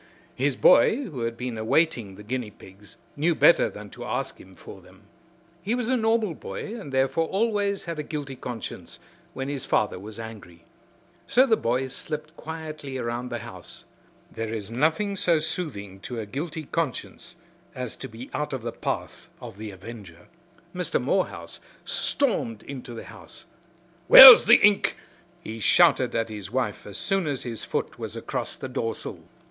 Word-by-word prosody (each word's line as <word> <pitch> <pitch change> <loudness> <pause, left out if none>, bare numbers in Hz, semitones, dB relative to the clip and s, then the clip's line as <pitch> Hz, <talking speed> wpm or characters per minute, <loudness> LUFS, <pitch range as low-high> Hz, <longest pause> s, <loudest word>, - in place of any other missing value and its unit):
His - - 0
boy, - - +5
who 155 - -7
had 115 0 -4
been 125 -2 -4
awaiting 115 - +1
the 105 - -12
guinea 120 0 -3
pigs, 100 0 -15 0.2
knew 160 +3 +1
better 170 - +5
than 105 -1 -11
to 120 +1 -9
ask 125 +2 -4
him 95 0 -16
for 95 - -12
them. 90 +1 -19 0.6
He 210 +7 -1
was 245 -1 -2
a 260 - +3
normal 225 -5 +1
boy 210 - -7
and 200 -12 -8
therefore 135 +5 +1
always 200 -1 0
had 170 -2 -5
a - - 0
guilty 145 -3 -6
conscience 115 -8 -7 0.4
when 135 0 -4
his 140 -2 -3
father 105 -3 0
was 105 +3 -9
angry. 105 -7 -10 0.6
So 255 +2 +5
the 230 -4 +4
boy 125 - 0
slipped 155 +4 -6
quietly 155 -5 -7
around 120 0 -3
the 120 - -3
house. 95 -7 -9 0.5
There 115 -1 -4
is 110 -2 -5
nothing 160 - +1
so 175 -4 +3
soothing 125 - -4
to 120 +4 -6
a 110 - -4
guilty 155 +8 -5
conscience 165 +3 -4 0.4
as 125 -3 -5
to - - -6
be 115 +4 -11
out 150 -1 -3
of 130 -4 -4
the 120 - -3
path - - -5
of 100 - -10
the 110 -1 -6
avenger. 95 -3 -11 0.4
Mr. - - -1
Morehouse - - -2 0.3
stormed 110 -2 -1
into 125 -3 -8
the - - -7
house. - - -13 0.6
"Where's 260 -3 +12
the 235 - +8
ink?" 205 -1 +3 0.5
he 110 +1 -7
shouted 135 +1 +4
at 115 0 0
his 105 -3 -7
wife 120 -3 -2
as 100 - -7
soon 195 -4 0
as 140 -3 -2
his 115 -3 -5
foot - - -3
was - - -6
across - - -4
the - - -7
doorsill. 120 -3 -3
130 Hz, 170 wpm, -25 LUFS, 110-165 Hz, 0.6 s, Where's